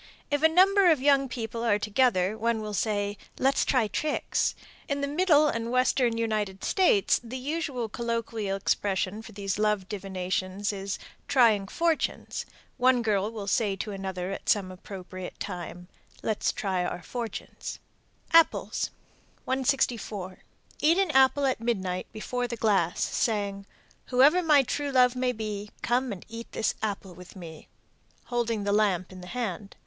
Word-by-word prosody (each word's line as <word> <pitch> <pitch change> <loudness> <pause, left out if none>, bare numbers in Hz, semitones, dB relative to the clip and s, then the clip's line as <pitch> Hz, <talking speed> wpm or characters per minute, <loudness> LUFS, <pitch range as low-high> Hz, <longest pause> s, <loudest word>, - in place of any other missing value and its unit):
If 290 0 +1
a 320 - +7
number 380 +3 +5
of 315 -4 +4
young 275 -1 +3
people 230 -1 -4
are 215 -3 +3
together, 210 -2 +2
one 230 +1 0
will 215 -1 -5
say, 205 -1 -1 0.2
"Let's 270 +1 +2
try 250 -5 +2
tricks." 300 +8 -1 0.3
In 280 -1 -1
the 280 - 0
Middle 305 0 +4
and 230 -4 -2
Western 255 -1 +2
United 215 -4 -1
States 355 - +3
the 240 +2 -6
usual 275 -3 -2
colloquial 230 -3 -2
expression 195 +1 -1
for 225 - -11
these 195 -1 -3
love 210 -3 +1
divinations 190 0 -2
is 195 0 -4 0.3
"trying 220 -7 +4
fortunes." 330 +6 -1 0.3
One 250 -1 +4
girl 210 -1 +1
will 215 -3 -6
say 200 0 +1
to 210 +2 -5
another 190 -2 -4
at - - -5
some 195 -3 +2
appropriate 185 0 -8
time, 180 -2 -6 0.4
"Let's 215 -2 0
try 190 -3 -1
our 175 0 -4
fortunes." 235 -3 -6 0.6
APPLES. 330 0 +4 0.6
164. 245 -8 -1 0.4
Eat 325 +3 +4
an 390 -4 +2
apple 265 +1 +4
at 260 -3 +1
midnight 190 -6 -1
before 245 +3 -3
the 235 0 -5
glass, 195 -6 +2
saying, 200 -3 -1 0.4
Whoever 280 +8 +5
my 300 -5 +5
true 290 +3 -2
love 250 -1 +4
may 250 0 +1
be, 210 -3 -5
Come 245 +1 +1
and 190 -4 -7
eat 230 +1 -8
this 220 - 0
apple 200 -3 -3
with 180 +2 -13
me, 165 -4 -10 0.7
holding 230 -3 0
the 200 0 0
lamp 195 -4 +1
in 185 -1 -10
the 180 - -10
hand. 210 -3 -4
220 Hz, 155 wpm, -27 LUFS, 195-255 Hz, 0.7 s, a